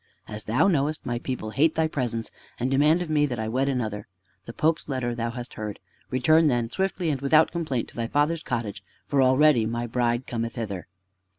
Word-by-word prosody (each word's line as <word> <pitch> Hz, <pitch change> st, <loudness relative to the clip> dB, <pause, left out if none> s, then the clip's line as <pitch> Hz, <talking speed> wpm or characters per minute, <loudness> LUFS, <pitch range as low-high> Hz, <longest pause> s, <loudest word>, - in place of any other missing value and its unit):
As 105 Hz, 0 st, -7 dB
thou 120 Hz, -, +3 dB
knowest, 155 Hz, -4 st, 0 dB
my 120 Hz, 0 st, -2 dB
people 120 Hz, -4 st, -4 dB
hate 155 Hz, +8 st, +2 dB
thy 160 Hz, 0 st, +2 dB
presence, 120 Hz, -6 st, -3 dB, 0.3 s
and 125 Hz, +2 st, -1 dB
demand 150 Hz, +6 st, +4 dB
of 170 Hz, -, -8 dB
me 150 Hz, -1 st, +3 dB
that 125 Hz, -3 st, -4 dB
I 110 Hz, 0 st, -2 dB
wed 130 Hz, +5 st, 0 dB
another. 110 Hz, -6 st, -2 dB, 0.4 s
The -, -, -5 dB
Pope's 160 Hz, +2 st, 0 dB
letter 130 Hz, -3 st, -1 dB
thou 115 Hz, 0 st, -2 dB
hast 120 Hz, +1 st, -7 dB
heard. 105 Hz, -1 st, -6 dB, 0.3 s
Return 155 Hz, +6 st, +4 dB
then, 120 Hz, -4 st, 0 dB
swiftly 190 Hz, -3 st, -1 dB
and 135 Hz, -2 st, -3 dB
without 155 Hz, +3 st, +4 dB
complaint, 155 Hz, -8 st, -2 dB
to -, -, -17 dB
thy 115 Hz, -1 st, -2 dB
father's 150 Hz, +5 st, +1 dB
cottage, 110 Hz, -, -4 dB, 0.2 s
for 140 Hz, -1 st, +2 dB
already 130 Hz, -2 st, +4 dB
my 120 Hz, +1 st, -2 dB
bride 120 Hz, +1 st, 0 dB
cometh 115 Hz, 0 st, -3 dB
hither." 100 Hz, -7 st, -5 dB
125 Hz, 200 wpm, -26 LUFS, 115-150 Hz, 0.4 s, demand